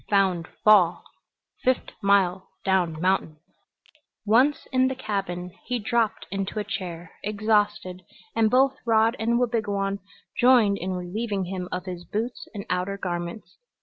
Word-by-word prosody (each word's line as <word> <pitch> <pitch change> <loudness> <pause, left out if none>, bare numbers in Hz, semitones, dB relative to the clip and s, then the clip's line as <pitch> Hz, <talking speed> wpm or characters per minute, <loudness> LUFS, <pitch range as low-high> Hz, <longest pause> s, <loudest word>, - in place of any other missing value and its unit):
"Found 190 -5 +2 0.2
fall. 190 -5 +5 0.6
Fift' 255 0 0
mile 190 -2 +2 0.2
down 180 -5 +1
mountain." 180 -3 0 0.9
Once 250 +8 +3
in 260 -1 +3
the 265 - -2
cabin 195 -7 -3 0.2
he 250 - 0
dropped 230 0 0
into 195 +2 -3
a 210 - 0
chair, 175 -4 -6
exhausted, 210 -3 0 0.3
and 220 -1 +3
both 265 +3 +3
Rod 225 0 +3
and 235 +1 +1
Wabigoon 205 -5 0 0.4
joined 240 -5 +5
in 185 +1 -3
relieving 195 +2 -3
him 180 0 -5
of 180 0 -4
his 180 -2 -6
boots 225 +7 -4
and 200 - -5
outer 180 +2 -1
garments. 175 +1 -5
200 Hz, 135 wpm, -25 LUFS, 180-225 Hz, 0.9 s, fall